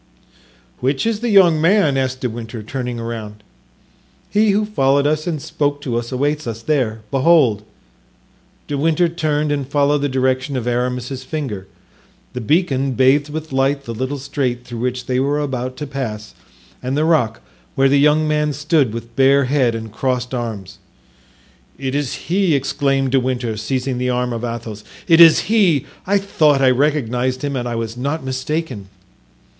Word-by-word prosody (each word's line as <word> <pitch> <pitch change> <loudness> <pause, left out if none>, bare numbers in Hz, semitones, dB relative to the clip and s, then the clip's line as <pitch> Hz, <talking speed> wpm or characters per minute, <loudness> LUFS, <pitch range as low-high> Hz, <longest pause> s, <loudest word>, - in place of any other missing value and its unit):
"Which 135 - 0
is 225 -2 0
the 240 +1 -2
young 180 -7 +5
man?" 165 -4 +3
asked 130 -1 -1
De 125 - 0
Winter, 115 -1 -7
turning 125 +1 -4
around. 110 -2 -6 0.9
"He 210 +1 +3
who 205 +1 +2
followed 140 -8 +2
us 155 +2 0
and 160 -3 -2
spoke 145 -1 -2
to 125 -4 -3
us 120 +1 -3
awaits 145 +3 -1
us 115 0 -5
there; 120 -7 0
behold!" 135 -6 +4 1.1
De 145 -1 -2
Winter 165 +3 +2
turned 155 -3 -1
and 140 -3 -2
followed 145 0 +2
the 145 0 -1
direction 130 +1 0
of 120 - -3
Aramis's 125 +2 -2
finger. 130 -11 -5 0.7
The 125 - -4
beacon 135 - +1
bathed 135 +4 +3
with 155 0 -6
light 135 +1 +1
the 115 - -5
little 130 +5 -3
strait 130 -3 -2
through 120 -2 -7
which 125 +1 -2
they 125 -1 0
were 140 +2 +1
about 130 -3 -3
to 150 - -4
pass 120 -7 -5 0.5
and 130 +2 -2
the 155 - +2
rock 120 -9 +2 0.4
where 135 0 +4
the 140 +1 +3
young 150 +2 +3
man 150 -1 +1
stood 150 -5 +1
with 115 0 -8
bare 135 +1 +4
head 130 -3 +1
and 110 -1 -6
crossed 125 +2 -2
arms. 115 -6 -5 1.0
"It 135 -1 -3
is 145 -2 -1
he!" 180 -2 +2
exclaimed 135 -1 0
De 135 - +4
Winter, 125 -3 -2
seizing 125 +4 -2
the 125 0 -1
arm 125 0 -1
of 115 0 -5
Athos; 115 -3 -5 0.2
"it 165 -1 +6
is 165 -2 +8
he! 185 - +2 0.2
I 200 +1 +3
thought 155 -8 +2
I 130 -1 +4
recognized 130 -2 0
him 140 -1 -2
and 125 -1 -2
I 120 - -3
was 115 0 -4
not 140 +5 -3
mistaken." 130 -5 -3
135 Hz, 170 wpm, -19 LUFS, 125-150 Hz, 1.1 s, is